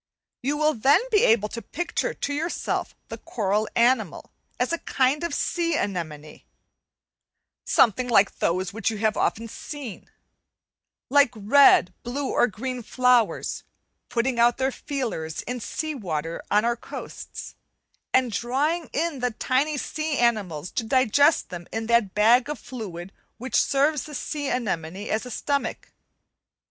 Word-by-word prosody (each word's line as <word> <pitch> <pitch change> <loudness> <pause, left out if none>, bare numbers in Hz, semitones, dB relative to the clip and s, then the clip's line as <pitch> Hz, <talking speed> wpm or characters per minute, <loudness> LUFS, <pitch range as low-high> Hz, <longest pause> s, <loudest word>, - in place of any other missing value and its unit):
You 285 +4 -1
will 305 +1 +3
then 270 +7 +4
be 420 -2 +4
able 220 -2 +3
to 230 - -6
picture 350 - -2
to 285 - -3
yourself 325 +4 -2
the - - -7
coral 210 -1 -1
animal 235 -6 +1 0.3
as 250 +6 0
a 335 - -1
kind 270 +4 +1
of 340 - -2
sea 335 -2 0
anemone, 155 -6 -4 1.2
something 245 +2 +3
like 205 -5 +3
those 185 +2 0
which 220 -1 0
you 220 - -4
have 215 +1 +1
often 230 +1 0
seen, 260 -1 -8 1.0
like 285 -2 +6
red, 215 -3 +5
blue, 265 +3 -3
or 240 - +3
green 250 +4 -5
flowers, 250 -1 +1 0.5
putting 240 +1 0
out 240 +1 +4 0.2
feelers 230 - -4
in 250 0 -4
sea 310 +7 -4
water 165 - -4
on 210 +2 +3
our 235 0 +1
coasts, 235 - -8 0.6
and 255 -2 +3
drawing 290 +9 -1
in 315 -2 -1
the 250 0 +1
tiny 265 +6 0
sea 310 +1 -2
animals 190 -9 0
to 235 - -2
digest 265 +5 +3
them 175 -1 -8
in 225 0 -3
that 235 -4 +2
bag 235 +5 +4
of 300 - -3
fluid 195 -7 -8 0.2
which 255 +2 -8
serves 285 +1 +1
the 300 - -8
sea 290 +2 -3
anemone 190 -5 -3
as 220 +3 -1
a - - -7
stomach. 280 +4 -3
240 Hz, 145 wpm, -25 LUFS, 210-285 Hz, 1.2 s, like